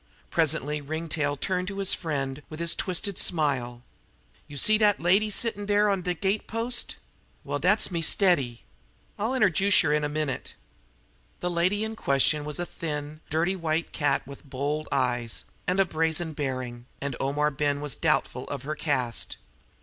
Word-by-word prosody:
Presently 150 Hz, +3 st, 0 dB
Ringtail 150 Hz, -1 st, -2 dB
turned 180 Hz, +3 st, -1 dB
to 200 Hz, 0 st, -5 dB
his 195 Hz, -1 st, +2 dB
friend 140 Hz, -4 st, -3 dB
with 155 Hz, -, -8 dB
his 170 Hz, 0 st, +3 dB
twisted 190 Hz, +1 st, -1 dB
smile: 130 Hz, -7 st, +2 dB, 0.6 s
"Yer 145 Hz, -, -9 dB
see 215 Hz, +9 st, +6 dB
dat 210 Hz, -2 st, +4 dB
lady 195 Hz, +6 st, +3 dB
settin' 210 Hz, -1 st, -1 dB
on 205 Hz, -2 st, +3 dB
de 180 Hz, 0 st, -1 dB
gate 195 Hz, +4 st, 0 dB
post? 235 Hz, +2 st, 0 dB, 0.5 s
Well, -, -, -3 dB
dat's -, -, +3 dB
me 170 Hz, -2 st, -1 dB
steady. 155 Hz, -, +2 dB, 0.6 s
I'll 220 Hz, +5 st, 0 dB
interjuce 200 Hz, -4 st, +4 dB
yer 150 Hz, -, +2 dB
in 150 Hz, 0 st, +1 dB
a 150 Hz, -, 0 dB
minute." 150 Hz, -2 st, -3 dB, 0.8 s
The 180 Hz, -, -1 dB
lady 180 Hz, +5 st, +2 dB
in 220 Hz, 0 st, -3 dB
question 145 Hz, -3 st, +2 dB
was 150 Hz, -1 st, -3 dB
a 175 Hz, -, -1 dB
thin, 150 Hz, -2 st, -5 dB
dirty 170 Hz, +5 st, +1 dB
white 165 Hz, -2 st, -1 dB
cat 145 Hz, -3 st, 0 dB
with 140 Hz, +1 st, -11 dB
bold 145 Hz, +3 st, -3 dB
eyes 120 Hz, -3 st, 0 dB, 0.2 s
and 185 Hz, +2 st, +1 dB
a 195 Hz, -, +5 dB
brazen 160 Hz, -1 st, 0 dB
bearing, 130 Hz, -4 st, -4 dB
and 140 Hz, -2 st, -3 dB
Omar 150 Hz, +2 st, +1 dB
Ben 145 Hz, 0 st, 0 dB
was 145 Hz, -3 st, -1 dB
doubtful -, -, 0 dB
of 140 Hz, -2 st, -5 dB
her 150 Hz, +2 st, -3 dB
caste. 130 Hz, -7 st, -1 dB
155 Hz, 165 wpm, -27 LUFS, 140-185 Hz, 0.8 s, see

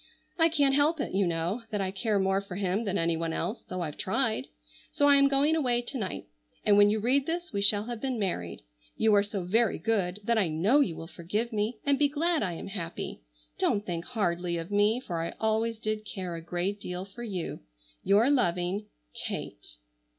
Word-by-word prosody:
I 330 Hz, 0 st, +5 dB
can't 285 Hz, -4 st, +3 dB
help 295 Hz, +3 st, +3 dB
it, -, -, -3 dB
you 195 Hz, -1 st, +2 dB
know, 170 Hz, +7 st, -1 dB
that 210 Hz, -2 st, -2 dB
I 190 Hz, -1 st, -1 dB
care 205 Hz, +2 st, 0 dB
more 195 Hz, 0 st, +2 dB
for 200 Hz, -2 st, -8 dB
him 195 Hz, +3 st, -1 dB
than 200 Hz, -1 st, 0 dB
anyone 165 Hz, -1 st, 0 dB
else, 220 Hz, -, -2 dB
though 185 Hz, 0 st, -6 dB
I've 150 Hz, -4 st, -4 dB
tried. -, -, 0 dB, 0.4 s
So 285 Hz, -, +3 dB
I 285 Hz, -, +8 dB
am 275 Hz, 0 st, +6 dB
going 280 Hz, +3 st, +3 dB
away 245 Hz, -6 st, +1 dB
to 265 Hz, +3 st, -4 dB
night 190 Hz, -4 st, -4 dB, 0.4 s
and 205 Hz, -, +5 dB
when 205 Hz, 0 st, +7 dB
you 215 Hz, +1 st, +1 dB
read 265 Hz, +5 st, +2 dB
this 345 Hz, -1 st, -3 dB
we 200 Hz, -, 0 dB
shall 205 Hz, 0 st, +4 dB
have 235 Hz, -1 st, -6 dB
been 260 Hz, -3 st, -1 dB
married. 90 Hz, -, -3 dB, 0.3 s
You 220 Hz, -1 st, +4 dB
are 205 Hz, -, +6 dB
so 200 Hz, -2 st, -4 dB
very 225 Hz, +6 st, +2 dB
good 200 Hz, -4 st, 0 dB
that 230 Hz, +1 st, +2 dB
I 195 Hz, -, +2 dB
know 180 Hz, -, +3 dB
you 180 Hz, -, +1 dB
will 165 Hz, -, -7 dB
forgive 205 Hz, +8 st, -3 dB
me, 215 Hz, +2 st, -1 dB
and 280 Hz, -1 st, +2 dB
be 290 Hz, -, +5 dB
glad 325 Hz, +3 st, +1 dB
I 185 Hz, -4 st, -1 dB
am 165 Hz, -, -7 dB
happy. 170 Hz, -, -5 dB, 0.4 s
Don't 205 Hz, 0 st, +1 dB
think 170 Hz, -1 st, -4 dB
hardly 175 Hz, -6 st, -1 dB
of 165 Hz, +3 st, -6 dB
me 205 Hz, +3 st, +3 dB
for 170 Hz, -9 st, -3 dB
I 165 Hz, -, -4 dB
always 220 Hz, +1 st, +1 dB
did 215 Hz, -1 st, -3 dB
care 185 Hz, -4 st, -5 dB
a 165 Hz, -, -5 dB
great 180 Hz, +4 st, -3 dB
deal 180 Hz, +1 st, -5 dB
for 200 Hz, +5 st, -12 dB
you. 195 Hz, -8 st, -4 dB, 0.4 s
"Your 220 Hz, +7 st, +4 dB
loving 180 Hz, -4 st, 0 dB, 0.3 s
"KATE." -, -, -6 dB
205 Hz, 210 wpm, -29 LUFS, 180-240 Hz, 0.4 s, I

